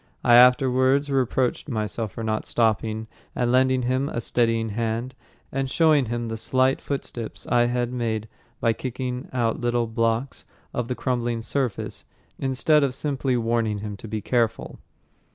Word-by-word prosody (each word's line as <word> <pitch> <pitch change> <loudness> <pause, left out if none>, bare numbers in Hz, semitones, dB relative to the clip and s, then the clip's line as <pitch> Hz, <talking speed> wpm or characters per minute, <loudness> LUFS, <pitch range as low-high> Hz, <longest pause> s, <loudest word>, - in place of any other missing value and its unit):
I 120 - +5
afterwards 130 +3 +5
reproached 130 +1 0
myself 110 -2 -3
for 115 - -5
not 110 -1 -2
stopping 110 -1 0 0.3
and 120 -1 +1
lending 130 0 +3
him 130 +3 0
a - - -3
steadying 115 -1 +1
hand, 115 +3 -2 0.4
and 135 0 -2
showing 155 -3 +4
him 120 0 -3
the 115 0 -4
slight 130 +3 +1
footsteps 125 -5 -5
I 120 -1 +3
had 120 0 -1
made 110 -3 -2 0.3
by 115 - +2
kicking 125 +1 -4
out 120 -3 0
little 120 -1 +1
blocks 115 +3 -1 0.3
of 125 -1 -2
the 125 - -2
crumbling 120 -3 -1
surface, 130 -3 -2 0.4
instead 140 +3 +2
of 130 -2 0
simply 135 -3 -1
warning 115 -2 0
him 105 0 -5
to 110 - -9
be 110 0 -3
careful. 115 +1 -1
120 Hz, 150 wpm, -24 LUFS, 115-130 Hz, 0.4 s, I